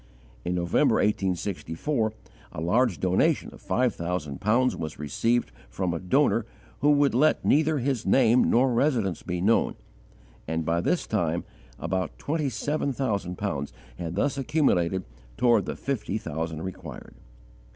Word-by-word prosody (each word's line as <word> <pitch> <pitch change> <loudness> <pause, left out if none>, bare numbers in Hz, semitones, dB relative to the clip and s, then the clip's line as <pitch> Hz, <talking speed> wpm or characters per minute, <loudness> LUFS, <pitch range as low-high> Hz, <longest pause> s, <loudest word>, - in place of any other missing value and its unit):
In 90 - -1
November, 85 -1 +2
1864, 100 - -1 0.4
a - - -5
large 105 +5 +2
donation 95 0 +1
of - - -14
five 125 -2 +1
thousand 85 -5 -4
pounds 120 +5 +2
was 80 -1 -5
received 95 - 0 0.2
from 85 +9 -2
a 85 - -2
donor 115 +3 +2 0.3
who 145 - +3
would 145 -1 +4
let 150 +6 +3
neither 155 +1 +3
his 130 -2 -1
name 120 +4 +4
nor 125 +1 +3
residence 115 - +1
be 90 -1 -3
known, 110 +5 +2 0.7
and 80 0 -2
by 85 +1 +1
this 175 - 0
time 85 -5 0 0.3
about 95 -2 -2
twenty 150 -1 -1
seven 140 +5 -1
thousand 100 -9 -2
pounds 75 -10 -3 0.3
had 85 0 -4
thus 140 +7 0
accumulated 95 - +1 0.3
toward 120 -4 +3
the - - -3
fifty 115 -6 -2
thousand 80 -4 -4
required. 95 -1 -8
105 Hz, 140 wpm, -26 LUFS, 85-130 Hz, 0.7 s, would